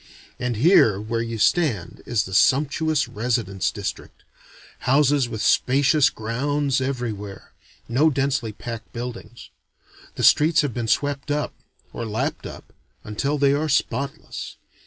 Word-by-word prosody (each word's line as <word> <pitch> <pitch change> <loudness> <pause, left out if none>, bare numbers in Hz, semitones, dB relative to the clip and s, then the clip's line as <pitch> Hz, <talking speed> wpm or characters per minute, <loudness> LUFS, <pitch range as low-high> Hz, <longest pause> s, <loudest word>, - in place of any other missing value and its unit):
And 125 -1 -2
here 115 - +5
where 115 +2 -2
you 115 0 -4
stand 110 - 0
is 115 -3 +1
the 95 - -8
sumptuous 145 - +2
residence 105 -5 -1
district. 100 -2 -6 0.7
Houses 140 -2 +3
with 110 -2 -4
spacious 140 +3 +3
grounds 135 +5 -1
everywhere: 115 -7 -5 0.4
no 135 +7 +3
densely 135 -5 -1
packed 115 +1 -8
buildings. 120 0 -8 0.6
The - - -4
streets 160 +2 +5
have 145 -5 -2
been 120 -1 -3
swept 145 +4 0
up 150 0 -1 0.4
or - - -5
lapped 110 +1 -3
up - - -12 0.3
until 140 +8 -2
they 140 -1 +3
are 155 +2 -1
spotless. 140 0 -2
125 Hz, 130 wpm, -23 LUFS, 110-145 Hz, 0.7 s, here